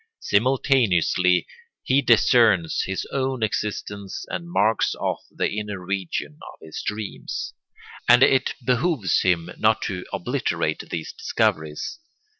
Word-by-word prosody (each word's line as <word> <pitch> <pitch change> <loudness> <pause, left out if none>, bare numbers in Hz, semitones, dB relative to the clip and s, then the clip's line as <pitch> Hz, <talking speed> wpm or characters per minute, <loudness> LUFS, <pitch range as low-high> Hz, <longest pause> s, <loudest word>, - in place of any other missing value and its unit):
Simultaneously 100 - +2 0.4
he 135 +2 +3
discerns 110 - +4
his 95 - -3
own 130 -3 -1
existence 105 -2 -3
and 170 - -5
marks 110 -8 +2
off - - -2
the - - -1
inner 105 -1 -4
region 90 -5 -4
of - - -21
his 80 -1 -7
dreams. 105 0 -5 0.6
And 120 +2 +8
it 135 -1 +3
behooves 125 - +1
him 90 -1 +1
not 110 0 +3
to 90 -2 -4
obliterate - - -2
these 80 - -5
discoveries. 80 - -1
105 Hz, 115 wpm, -23 LUFS, 90-125 Hz, 0.6 s, And